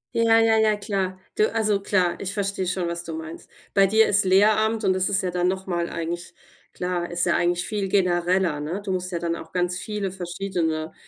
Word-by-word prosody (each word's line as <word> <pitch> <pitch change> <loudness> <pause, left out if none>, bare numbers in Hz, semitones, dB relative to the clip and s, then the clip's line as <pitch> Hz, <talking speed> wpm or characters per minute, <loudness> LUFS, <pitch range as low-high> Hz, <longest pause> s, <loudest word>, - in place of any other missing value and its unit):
Ja, 230 -1 +4
ja, 225 -1 +4
ja, 215 -1 +3
klar. 195 -3 -3 0.2
Du 215 - +2
also 215 -3 +2
klar, 185 -4 +1
ich 195 +2 -4
verstehe 195 -2 -2
schon, 180 -1 -1
was 170 0 -4
du 165 -1 -6
meinst. 160 +1 -8 0.2
Bei 195 -1 +5
dir 220 +2 +4
ist 200 -1 +3
Lehramt 215 +3 +3
und 190 -1 +3
das 185 +1 0
ist 195 -1 +1
ja 180 - -1
dann 180 0 0
noch 190 +1 -2
mal 175 -2 -2
eigentlich 170 +1 -5 0.4
klar, 180 -1 -3
ist 175 0 +1
ja 170 - +2
eigentlich 175 0 +1
viel 205 -2 -2
genereller, 180 -3 +1
ne? 165 +7 -3
Du 195 - -3
musst 185 0 -2
ja 170 - -2
dann 170 0 -2
auch 160 -1 -10
ganz 180 0 -1
viele 210 -3 -3
verschiedene, 175 -3 -3
185 Hz, 215 wpm, -24 LUFS, 175-200 Hz, 0.4 s, Bei